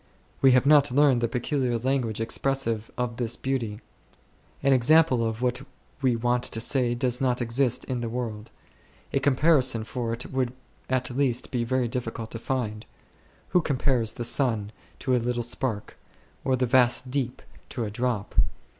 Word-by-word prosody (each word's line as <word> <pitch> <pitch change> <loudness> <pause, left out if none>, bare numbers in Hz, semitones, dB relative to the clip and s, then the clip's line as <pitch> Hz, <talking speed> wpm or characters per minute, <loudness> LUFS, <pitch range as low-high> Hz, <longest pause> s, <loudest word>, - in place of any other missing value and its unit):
We 135 -1 +6
have 130 +1 +4
not 145 -2 +5
learnt 140 -2 +4
the 120 - +1
peculiar 125 0 -1
language 120 -3 -1
expressive 115 -1 0
of 120 -2 -2
this 120 -1 0
beauty. 120 -5 -3 0.8
An 140 -1 +4
example 130 0 +4
of 115 +1 -3
what 125 -1 0 0.4
we 130 -3 +2
want 120 +1 +1
to 115 - -2
say 120 0 +2
does 125 +1 0
not 125 -2 +1
exist 125 +1 0
in 125 -2 -3
the 115 - -3
world; 115 -2 -5 0.6
a 140 - +2
comparison 135 -3 +3
for 115 0 -4
it 115 +2 -5
would 130 -2 -1 0.4
at 130 -1 0
least 130 -3 0
be 120 -2 0
very 125 +1 0
difficult 115 -2 -5
to 115 - -6
find. 115 -4 -3 0.6
Who 180 - +3
compares 130 -6 0
the 120 - -5
Sun 115 -5 0 0.3
to 130 -2 +1
a 125 - +1
little 120 0 -1
spark? 120 -3 -3 0.4
or 130 - +2
the 130 0 +1
vast 125 0 +3
Deep 130 -3 -2 0.3
to 120 - -4
a 105 - -4
drop 120 -2 -2
125 Hz, 165 wpm, -26 LUFS, 115-130 Hz, 0.8 s, We